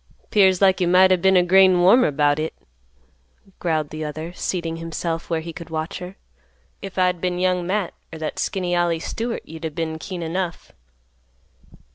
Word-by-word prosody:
"'Pears 190 -2 +4
like 190 -1 +4
you 175 - +2
might 185 +1 +5
o' - - +6
been 190 +1 +3
a 180 - +5
grain 185 0 +5
warmer 215 +8 +6
about 145 0 +1
hit," 160 +1 -3 1.0
growled 155 -4 -1
the 155 0 -5
other, 155 +3 -6
seating 170 -3 -3
himself 165 0 -4
where 165 -2 0
he 165 +1 -7
could 170 0 -9
watch 160 0 -4
her. 180 +1 -8 0.7
"If 195 -1 -8
I'd 180 -2 +1
been 180 -1 -1
Young 180 -1 0
Matt 195 -1 -1 0.2
er 160 - -7
that 155 -1 -5
skinny 180 -2 -1
Ollie 175 -1 +1
Stewart, 230 +7 -4
you'd 160 +1 -10
a' 160 - -1
been 160 +1 -4
keen 180 0 -6
enough." 175 +1 -4
175 Hz, 180 wpm, -22 LUFS, 160-185 Hz, 1.0 s, o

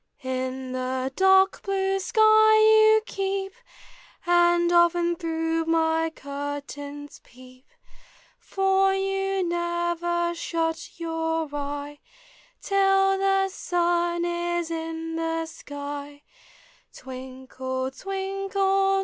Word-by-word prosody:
In 260 0 -4
the 255 +1 -3
dark 385 0 +4
blue 390 0 0
skv 385 - -7
vou 435 0 +6
keep, 390 -1 -3 0.7
And 345 0 +3
often 345 0 +3
through 325 -1 -2
iny 325 0 +1
curtains 285 +1 -7
peep; 255 +1 -17 0.7
For 385 0 +1
you 390 0 -1
never 345 0 -1
shut 330 -1 -3
your 325 -1 -2
eye 290 0 -5 0.6
Till 390 -1 +3
the 390 0 +2
sun 345 -1 0
is 345 -1 -2
in 325 0 -4
the 325 0 -2
sky. 285 -1 -8
345 Hz, 80 wpm, -25 LUFS, 295-385 Hz, 0.7 s, vou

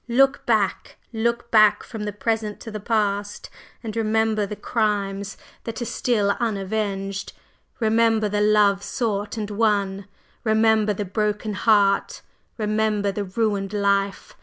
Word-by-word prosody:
Look 270 +3 +3
back, 215 -5 0 0.2
look 235 +1 -1
back 215 -2 +5
from 220 -3 -6
the 210 - -2
present 215 +1 -2
to 225 - -8
the 215 - -5
past, 205 -1 -1 0.3
and 220 -2 -5
remember 220 -1 +1
the 210 - -5
crimes 200 -3 -2 0.3
that 230 -1 -5
are 240 - -3
still 215 -4 +1
unavenged! 195 -3 -2 0.5
Remember 225 -1 +2
the 205 0 -1
love 210 -2 +4
sought 210 -2 -2
and 210 -1 -4
won! 200 -2 0 0.4
remember 220 -1 +3
the 205 +1 -4
broken 210 +2 -2
heart! 200 -1 +2 0.3
remember 215 -2 0
the 200 +1 -3
ruined 200 0 -1
life! 200 -1 0
210 Hz, 135 wpm, -23 LUFS, 200-220 Hz, 0.5 s, back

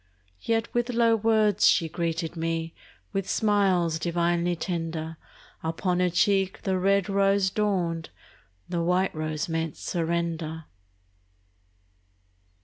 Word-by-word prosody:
Yet 225 0 -1
with 240 +1 0
low 230 -1 +3
words 215 -2 +3
she 165 - +4
greeted 165 0 -3
me, 165 0 -2 0.4
With 195 -1 -2
smiles 190 -6 +2
divinely 170 +1 0
tender; 165 -2 -4 0.4
Upon 175 +3 -1
her 180 0 +3
cheek 195 +2 +1
the 190 -1 0
red 195 0 +2
rose 195 -1 +2
dawned, 180 -6 -1 0.6
The 175 -1 -2
white 180 +3 +1
rose 155 -1 -3
meant 165 -2 -2
surrender. 165 -2 -2
175 Hz, 110 wpm, -26 LUFS, 165-195 Hz, 0.6 s, she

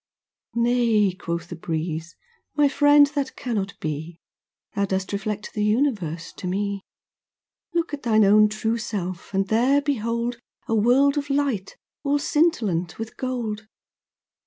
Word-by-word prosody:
'Nay,' 235 -4 +3
quoth 170 -2 -4
the 175 - -5
breeze, 160 0 -4 0.4
'my 295 -1 +5
friend, 290 +1 +6
that 280 -2 -2
cannot 205 -5 -3
be. 160 +2 -5 0.5
Thou 200 -1 +1
dost 190 0 -2
reflect 210 +1 -3
the 210 - -1
Universe 210 - 0
to 185 - -5
me. 200 +1 -1 0.9
Look 335 -3 0
at 290 - -3
thine 220 -3 +4
own 210 +1 +6
true 220 +2 -1
self, 185 -5 -4
and 195 0 0
there 250 +7 +3
behold 235 -4 -1 0.3
A - - -1
world 265 +6 +4
of 285 0 -6
light, 275 -9 -1 0.3
all 285 +1 +2
scintillant 220 - +1
with 225 0 -6
gold. 225 -4 -3
215 Hz, 135 wpm, -24 LUFS, 190-255 Hz, 0.9 s, friend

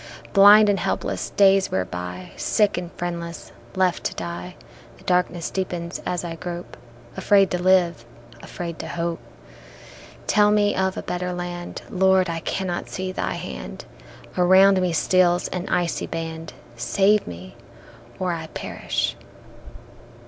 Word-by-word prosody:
Blind 205 +1 +8
and 200 -1 +2
helpless - - -2
days 195 -1 +4
wear 95 -1 -1
by, 90 +1 -7
Sick 210 -2 +1
and 175 0 -5
friendless, 170 -1 -5 0.2
left 185 -2 +1
to - - -2
die; 85 +1 -6 0.4
The - - -18
darkness 180 -1 0
deepens 175 -2 -4
as 180 -1 -2
I 170 -1 -4
grope, 175 0 -7 0.4
Afraid 195 -2 +3
to 180 - -1
live, 180 -6 +3 0.4
afraid 170 -2 -7
to 165 - -5
hope; 170 0 -3
They - - -19
tell 210 0 +4
me 205 -1 +3
of 190 0 0
a - - -4
better 180 0 -3
land, 175 0 -6
Lord, 190 -1 +3
I 165 - -3
cannot 180 +1 -3
see 185 0 -4
Thy - - -2
hand, 60 -1 -7 0.5
Around 185 +1 +5
me 180 -1 +1
steals 175 +1 +2
an 180 +1 -4
icy 175 -1 0
band, 165 -1 -5 0.2
Save 195 - +2
me 90 +2 -9 0.6
or 185 -1 -1
I 160 -1 -5
perish. - - -3
175 Hz, 140 wpm, -23 LUFS, 165-190 Hz, 0.6 s, Blind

